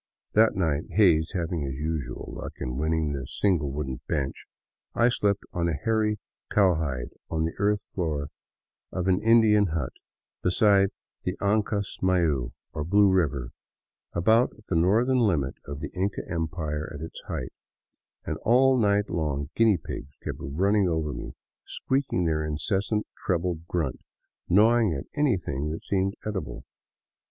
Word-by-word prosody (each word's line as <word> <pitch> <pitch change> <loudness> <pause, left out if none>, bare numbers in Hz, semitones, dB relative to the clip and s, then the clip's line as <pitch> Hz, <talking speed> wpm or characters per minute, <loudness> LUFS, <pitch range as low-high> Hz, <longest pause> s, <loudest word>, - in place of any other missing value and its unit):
That 110 +1 +5
night 80 -5 0
— - - -21
Hays 85 -6 +5
having 85 -2 -1
his 70 -2 -3
usual 75 -4 -4
luck - - -6
in 60 - -4
winning 80 +1 0
the 65 -3 -4
single 85 -9 +1
wooden 65 -3 -4
bench 70 -2 -2 0.2
— - - -50
I - - +6
slept 100 -4 +1
on 85 -1 0
a 80 - 0
hairy 105 +6 +1 0.3
cowhide 80 -11 +1 0.2
on 80 0 0
the 80 - -2
earth 105 +1 +2
floor 75 -5 -2 0.6
of 90 0 -2
an 95 0 +3
Indian 110 -2 +5
hut 80 -6 -2 0.5
beside 100 +1 +4 0.3
the 90 +1 -2
Ancasmayu, 95 - +1 0.2
or 75 - -2
Blue 100 +4 +4
River, 70 -9 +1 0.6
about 110 +8 +4 0.2
the 95 - 0
northern 110 +10 +3
limit 85 - +2
of 70 +1 -6
the - - -5
Inca 95 +2 -1
Empire 80 -3 -3
at 70 - -7
its - - -10
height; - - -4 0.7
and - - -2
all 130 +2 +4
night 105 -1 +3
long 75 -3 -2
guinea 110 -4 +4
pigs 70 -3 -8
kept - - -4
running 95 +7 +1
over 80 -3 -1
me, - - -7 0.3
squeaking 130 -10 -1
their 80 -1 +1
incessant 95 +7 -1 0.2
treble 90 -2 0
grunt, 80 -9 -2 0.5
gnawing 110 0 +4
at 70 - -5
anything 90 - 0
that 80 - -5
seemed 95 0 0
edible. 95 - -4
85 Hz, 145 wpm, -27 LUFS, 75-105 Hz, 0.7 s, I